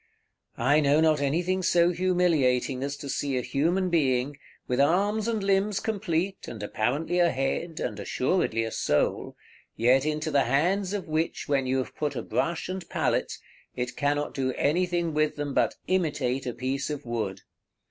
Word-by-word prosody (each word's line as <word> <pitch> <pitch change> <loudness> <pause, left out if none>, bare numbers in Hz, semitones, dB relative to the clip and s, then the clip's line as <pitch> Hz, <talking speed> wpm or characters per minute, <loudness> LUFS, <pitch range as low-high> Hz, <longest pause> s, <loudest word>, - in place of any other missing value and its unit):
I 140 +6 +3
know 145 0 +3
not 155 -2 +3
anything 175 +7 0
so 175 -1 +3
humiliating 165 -8 +1
as 140 +1 -3
to 140 - -8
see 140 0 -1
a 125 - -1
human 175 +8 0
being, 135 -3 +1 0.3
with 125 +1 0
arms 205 +8 +2
and 220 -3 -1
limbs 195 +1 +2
complete, 195 -3 -2
and 110 -3 -7
apparently 140 +12 -1
a 175 -1 +5
head, 135 +5 -2
and 110 - -3
assuredly 125 -5 0
a 115 - -4
soul, 75 - 0 0.4
yet 125 +4 +4
into 155 +1 -1
the 140 -2 +3
hands 180 - +1
of 200 -3 -3
which 160 +1 -2
when 135 -2 +1
you 130 +1 +1
have 130 - -3
put 150 -1 -2
a - - -3
brush 170 0 -1
and 185 -1 -6
pallet, - - 0 0.4
it 125 0 -3
cannot 145 +1 0
do 130 -1 -1
anything 170 +3 0
with 155 0 +1
them 145 -1 -3
but - - +2
imitate 145 -8 0
a 125 - -2
piece 130 +4 -2
of 145 -3 -5
wood. 110 -5 -3
150 Hz, 170 wpm, -27 LUFS, 130-175 Hz, 0.4 s, a